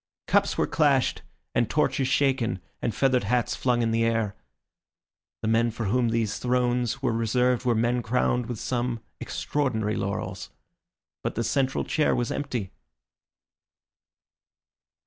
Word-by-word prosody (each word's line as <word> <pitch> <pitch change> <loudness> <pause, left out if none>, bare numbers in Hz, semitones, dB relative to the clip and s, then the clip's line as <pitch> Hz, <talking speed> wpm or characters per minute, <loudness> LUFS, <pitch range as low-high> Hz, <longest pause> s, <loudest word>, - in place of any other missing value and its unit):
Cups - - +2
were - - +3
clashed - - +2 0.3
and 120 -1 +1
torches 135 -3 +1
shaken, 130 -7 +1 0.2
and 115 - -1
feathered 130 -5 +2
hats 120 +2 +1
flung 120 -2 +1
in 115 - +1
the 115 0 +2
air. 115 -3 0 1.1
The - - 0
men 115 +1 +3
for 115 +1 -5
whom 120 +4 +2
these 115 -2 0
thrones 125 +1 0
were 130 - +2
reserved 125 +3 +1
were 120 -2 +3
men 120 +2 +1
crowned 120 0 +1
with 120 - -4
some 120 -2 -2 0.2
extraordinary 110 -7 -1
laurels. 95 -1 -3 0.7
But - - -3
the 115 - 0
central 130 +3 0
chair 155 - +1
was 120 -1 -1
empty. 120 -9 -3
120 Hz, 135 wpm, -26 LUFS, 115-125 Hz, 1.1 s, were